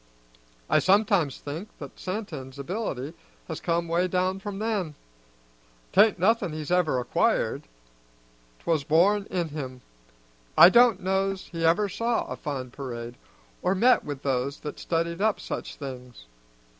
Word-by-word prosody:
I - - +4
sometimes 195 -7 +3
think 160 +9 -7
that 140 -3 -10
Santin's 155 -10 -5
ability 145 - -4 0.3
has 160 - -5
come 170 0 0
'way 170 +2 +1
down 185 +1 0
from 200 0 -6
then. 200 -8 -2 1.0
'Tain't 205 +1 +5
nothin' 190 -2 +2
he's 155 +1 -5
ever 175 -7 +2
acquired; 120 - 0 0.9
'twas 160 -4 0
born 195 +8 +3
in 175 -3 -1
him. 130 -4 -6 0.8
I 175 - +11
don't 235 -3 +5
know's 190 0 -1
he 165 -2 -4
ever 170 +6 +3
saw 230 +4 -1
a - - -5
fine 130 -4 -5
parade, 120 -3 -6 0.5
or 185 - +1
met 245 +6 +4
with 145 -2 -6
those 135 +1 -1
that 150 - -6
studied 170 +1 -1
up 215 -1 +2
such - - -5
things. 125 - -9
170 Hz, 140 wpm, -26 LUFS, 140-195 Hz, 1.0 s, I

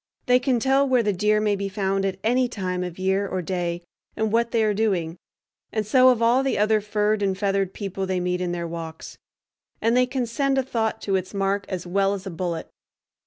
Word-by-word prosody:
They 250 0 +4
can 250 -2 +1
tell 270 +3 +2
where 250 -2 +3
the 205 -1 +1
deer 210 +3 +2
may 210 -1 +1
be 200 0 -3
found 195 0 -1
at 190 -1 -2
any 250 +3 +2
time 185 -5 -3
of 180 -2 -6
year 190 +2 0
or 185 -1 -3
day, 175 -1 -2 0.3
and 220 -1 0
what 235 +1 +2
they 230 -1 +1
are 215 -1 +2
doing; 190 -6 0 0.6
and 215 -1 -1
so 255 +4 +6
of 240 -2 +2
all 240 +3 +4
the 270 0 0
other 215 +1 +3
furred 210 0 0
and 195 -2 0
feathered 195 -2 0
people 195 -1 -4
they 185 -1 0
meet 180 0 -1
in 180 -1 -1
their 170 -1 -3
walks; 165 -1 -8 0.6
and 230 +2 +2
they 250 0 +4
can 255 -1 -1
send 270 +4 0
a 265 - +2
thought 225 -4 -2
to 195 - 0
its 185 +2 -6
mark 195 0 0
as 180 -2 -4
well 195 +2 +1
as 195 0 -8
a 190 - -5
bullet. 170 -1 -3
200 Hz, 225 wpm, -24 LUFS, 185-230 Hz, 0.6 s, so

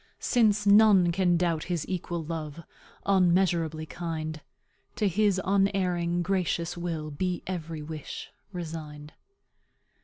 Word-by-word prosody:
"Since 215 -4 +2
none 200 -4 +6
can 175 -1 +2
doubt 170 -3 0
his 175 -4 -2
equal 175 -2 -3
love, 160 0 -5 0.4
Unmeasurably 175 -4 +2
kind, 160 -2 -5 0.5
To 210 - +1
his 200 0 +2
unerring, 185 -3 +1
gracious 175 -2 -1
will 165 -3 -4
Be 180 +4 -2
every 165 -4 -5
wish, 155 -1 -7 0.2
resigned. 155 -4 -7
175 Hz, 110 wpm, -28 LUFS, 160-190 Hz, 0.5 s, none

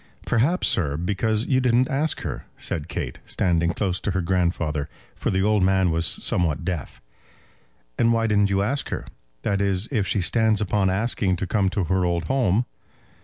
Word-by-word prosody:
"Perhaps, 150 +11 +2
sir, 75 -6 +1
because 105 +6 0
you 130 -2 +2
didn't 125 0 +3
ask 145 +4 -1
her," 75 -8 -5
said 75 0 -4
Kate, 85 - -5
standing 85 -2 +1
close 90 +1 -1
to - - -3
her 95 -1 0
grandfather, 85 -5 0 0.3
for - - -2
the 95 0 +1
old 105 0 +3
man 95 -1 +3
was 80 +1 0
somewhat 80 -4 -1
deaf. 85 -7 -4 1.0
"And 115 - +4
why 115 -1 +2
didn't 105 -2 +3
you 100 0 +1
ask 135 +7 -1
her; - - -4 0.4
that 100 -1 0
is, 100 +1 0
if 105 -7 0
she 105 - 0
stands 110 +2 +3
upon 100 -2 +1
asking 95 -1 0
to 95 - -3
come 95 0 +1
to 95 0 -1
her 95 +2 +1
old 85 -1 0
home?" 115 +2 +1
95 Hz, 180 wpm, -24 LUFS, 90-110 Hz, 1.0 s, And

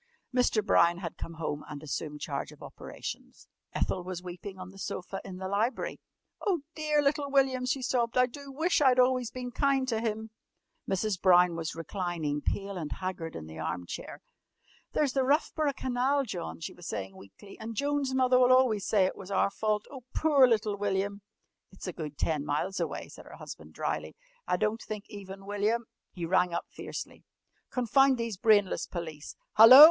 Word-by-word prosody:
Mr. 235 -4 +3
Brown 170 -2 +5
had 175 -3 -5
come 165 - -7
home 155 -2 -3
and 150 0 -7
assumed 150 0 -4
charge - - -3
of - - -14
operations. - - -8 0.2
Ethel 185 - -1
was 180 -1 -5
weeping 185 +2 -7
on 185 0 -8
the 195 - -14
sofa 195 0 -4
in 185 -2 -8
the 190 0 -4
library. 210 +6 -1 0.4
"Oh, 370 -7 +1
dear 305 -2 +1
little 285 0 +1
William!" 265 -2 +2
she 265 0 0
sobbed. 245 -2 +1
"I 250 - +6
do 275 +2 -9
wish 320 +4 +1
I'd 260 -3 +5
always 250 -1 +3
been 250 0 -6
kind 270 0 +2
to 225 -2 0
him!" 220 -1 -2 0.6
Mrs. 195 0 0
Brown 180 -2 +6
was 165 -1 -3
reclining, 165 -4 -2
pale 200 +3 -2
and 155 -4 -4
haggard, 185 -4 -4
in 80 - -6
the 80 +1 -9
arm 85 +2 -3
chair. - - -7 0.7
"There's 285 -4 +2
the 270 - +2
Roughborough 290 +1 +2
Canal, 260 +2 +1
John!" 80 - -5
she - - -5
was - - -10
saying 95 -2 -4
weakly. 100 - -14
"And 225 +1 -6
Joan's 285 +2 0
mother 255 -1 +4
will 250 0 +6
always 250 -6 +4
say 200 -3 +4
it 185 - -1
was 190 - -10
our 200 0 +2
fault. 210 0 0
Oh, 270 -2 -8
poor 285 -5 +6
little 215 -3 +1
William!" 200 0 -1 0.5
"It's 190 - -10
a 180 - -3
good 150 -4 -6
ten 155 -3 0
miles 150 +7 -1
away," - - -3
said - - -12
her - - -10
husband - - -10
drily. - - -3 0.3
"I - - +2
don't 215 +1 0
think 210 -1 -6
even 195 -2 -9
William 210 +3 0 0.2
" - - -56
He 175 -2 -3
rang 180 0 +2
up - - -2
fiercely. - - -7 0.5
"Confound 265 +2 +4
these 230 -2 -2
brainless 205 -1 +3
police! 160 -4 -6 0.2
Hallo! 225 +5 +12
205 Hz, 185 wpm, -30 LUFS, 180-255 Hz, 0.7 s, Hallo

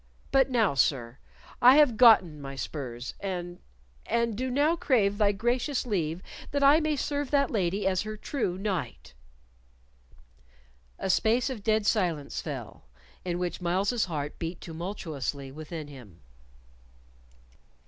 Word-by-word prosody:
But 270 -1 +4
now, 225 - +2
sir, 130 -3 0 0.4
I 250 +2 +8
have 290 -6 +5
gotten 200 - +6
my 135 0 -7
spurs, 130 -3 -5
and 175 -2 -5 0.5
and 235 -1 0
do 255 +4 -2
now 290 +6 +2
crave 210 -10 +1
thy 205 -1 +4
gracious 240 +6 -1
leave 175 -6 -2 0.3
that 285 0 -1
I 285 +3 +7
may 310 -1 0
serve 285 0 -2
that 280 -2 +2
lady 195 -2 0
as 185 -1 +1
her 215 0 -6
true 210 -6 -2
knight." 185 - -4 1.8
A - - -3
space 235 +7 +2
of 220 -6 -7
dead 220 -1 +1
silence 175 -10 0
fell, - - -7 0.4
in 175 -1 -2
which 180 0 -3
Myles's 195 +7 +1
heart 150 -4 -5
beat 165 +1 -4
tumultuously 160 -6 -5
within 155 +1 -7
him. 125 - -13
195 Hz, 135 wpm, -28 LUFS, 160-240 Hz, 1.8 s, I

